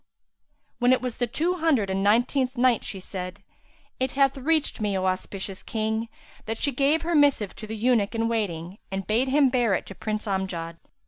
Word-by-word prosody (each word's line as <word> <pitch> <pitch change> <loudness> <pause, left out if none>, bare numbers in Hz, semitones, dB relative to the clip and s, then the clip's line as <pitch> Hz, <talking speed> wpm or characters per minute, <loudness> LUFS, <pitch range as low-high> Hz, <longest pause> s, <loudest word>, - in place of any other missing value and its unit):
When 245 +1 +5
it 255 - +1
was 250 -2 -3
the 245 - +1
Two 340 +9 0
Hundred 280 - +2
and 195 +1 0
Nineteenth 250 +5 +2
Night, 245 -2 +3
She 195 - -4
said, 185 +1 -7 0.6
It 260 0 -1
hath 275 0 +3
reached 295 -2 0
me, 205 -2 0
O 190 - -1
auspicious 190 +1 -3
King, 220 0 -2 0.4
that 225 +1 -2
she 285 - +1
gave 280 +5 +2
her 340 +1 -1
missive 285 - +3
to 215 - -7
the 220 +1 -5
eunuch 230 -2 +2
in 225 0 +1
waiting 195 -5 -3
and 195 0 -3
bade 230 +5 +1
him 275 0 +4
bear 240 -6 +2
it - - -3
to - - -9
Prince 215 +3 -3
Amjad. 185 -4 -3
225 Hz, 195 wpm, -26 LUFS, 195-260 Hz, 0.6 s, When